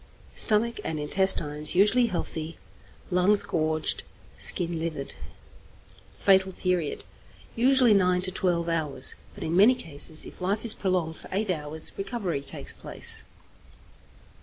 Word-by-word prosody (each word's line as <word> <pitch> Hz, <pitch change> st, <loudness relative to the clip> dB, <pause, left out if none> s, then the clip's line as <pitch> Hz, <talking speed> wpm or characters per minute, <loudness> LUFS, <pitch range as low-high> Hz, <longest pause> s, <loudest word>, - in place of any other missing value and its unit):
Stomach 230 Hz, +2 st, +2 dB
and 160 Hz, -1 st, -5 dB
intestines 150 Hz, -2 st, +3 dB
usually 215 Hz, +6 st, +3 dB
healthy. 165 Hz, -4 st, -6 dB, 0.5 s
Lungs 185 Hz, +3 st, +2 dB
gorged, 155 Hz, -1 st, 0 dB, 0.3 s
skin 170 Hz, -2 st, +1 dB
livid. 155 Hz, -4 st, -6 dB, 1.0 s
Fatal 190 Hz, -1 st, +2 dB
Period. 180 Hz, -4 st, -3 dB, 0.5 s
Usually 250 Hz, -1 st, +3 dB
nine 180 Hz, -2 st, +1 dB
to 185 Hz, -, 0 dB
twelve 175 Hz, -2 st, -2 dB
hours; 150 Hz, -6 st, 0 dB, 0.2 s
but -, -, -9 dB
in 160 Hz, -, -3 dB
many 215 Hz, +7 st, +5 dB
cases, 155 Hz, -, -1 dB
if -, -, -13 dB
life 200 Hz, +5 st, -3 dB
is 225 Hz, -, +7 dB
prolonged 180 Hz, -4 st, -3 dB
for -, -, -14 dB
eight 200 Hz, +1 st, -1 dB
hours, 155 Hz, -1 st, +4 dB
recovery 195 Hz, -, -4 dB
takes 140 Hz, -, -4 dB
place. -, -, 0 dB
180 Hz, 125 wpm, -25 LUFS, 160-200 Hz, 1.0 s, is